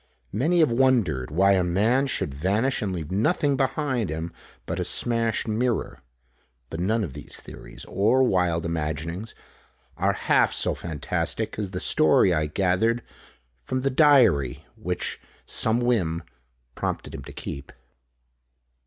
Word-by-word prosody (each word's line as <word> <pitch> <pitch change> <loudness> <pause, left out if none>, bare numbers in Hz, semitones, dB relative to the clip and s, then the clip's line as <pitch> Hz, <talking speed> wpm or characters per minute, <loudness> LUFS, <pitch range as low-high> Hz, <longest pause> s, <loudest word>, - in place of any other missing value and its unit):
Many 160 - +2
have 155 - +4
wondered 115 - +2
why 95 +6 +3
a 95 -2 +3
man 110 +10 +2
should 75 - -1
vanish 100 - 0
and 100 - -2
leave 85 -3 -5
nothing 140 - +1
behind 130 - -1
him 80 +2 -4 0.3
but - - -3
a - - 0
smashed 115 -2 0
mirror. 110 - -1 0.7
But 80 - -5
none 110 +5 +1
of 80 -9 -5
these - - -8
theories - - -10
or 115 +7 +2
wild 90 -7 +1
imaginings 85 +5 -4 0.6
are - - +2
half - - +2
so - - +2
fantastic 80 +5 -3
as 100 -3 -2
the 90 -1 -4
story 85 +3 +4
I 75 -2 0
gathered 100 +8 +1 0.6
from 130 - -3
the 135 +1 0
diary 120 - +4
which - - -4 0.2
some 115 +2 +1
whim 90 -10 0 0.5
prompted - - -4
him - - -7
to - - -9
keep. 70 - -7
100 Hz, 140 wpm, -25 LUFS, 85-125 Hz, 0.7 s, have